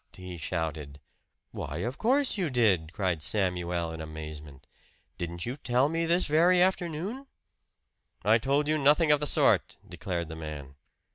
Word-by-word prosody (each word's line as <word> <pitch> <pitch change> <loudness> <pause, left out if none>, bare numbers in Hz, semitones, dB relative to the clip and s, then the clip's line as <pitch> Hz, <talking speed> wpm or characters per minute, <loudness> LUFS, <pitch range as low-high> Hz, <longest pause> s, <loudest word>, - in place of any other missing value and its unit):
he 90 -1 -8
shouted. 80 -4 -4 0.5
"Why, 70 +2 -5
of 125 +2 -5
course 270 +4 +2
you 185 -6 -1
did!" 100 - +2
cried 90 -5 -1
Samuel 90 -3 -1
in 80 0 -7
amazement. 75 -3 -9 0.5
"Didn't 85 0 -4
you 120 +2 -3
tell 130 0 +1
me 165 +1 -1
this 175 +2 +2
very 170 +4 +4
afternoon?" 185 - -1 1.0
"I 110 +2 +5
told 140 +5 +1
you 155 0 +1
nothing 150 +3 +4
of 150 - +4
the 150 - 0
sort!" - - +3
declared 85 -3 -4
the 80 - -7
man. 75 -4 -7
105 Hz, 150 wpm, -28 LUFS, -, 1.0 s, I